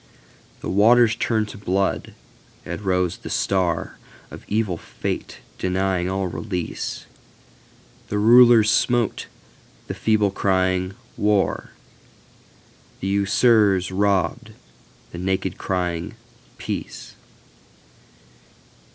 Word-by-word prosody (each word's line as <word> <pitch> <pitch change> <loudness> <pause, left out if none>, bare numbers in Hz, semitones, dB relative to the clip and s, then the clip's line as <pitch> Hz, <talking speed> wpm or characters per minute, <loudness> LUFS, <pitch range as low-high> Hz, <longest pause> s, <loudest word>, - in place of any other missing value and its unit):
The - - -5
waters 115 +4 +5
turned 110 -2 0
to 105 - -10
blood, 95 -1 -1 0.5
as 85 +4 -5
rose 90 -3 0
the - - -9
StarOf 90 -4 0 0.5
evil 105 -3 0
Fate - - -5 0.2
denying 95 -1 0
all 95 0 -1
release. 90 -1 -4 1.0
The 105 - -2
rulers 115 0 +6
smote, 120 +1 +1 0.6
the - - -5
feeble 105 -2 +1
crying 95 -1 0 0.2
"War!"The 100 -1 -5
usurers 100 -1 +3
robbed, 100 0 0 0.6
the 85 - -7
naked 95 0 -2
crying 90 -2 -2 0.4
"Peace!" - - -6
95 Hz, 85 wpm, -22 LUFS, 90-105 Hz, 1.0 s, rulers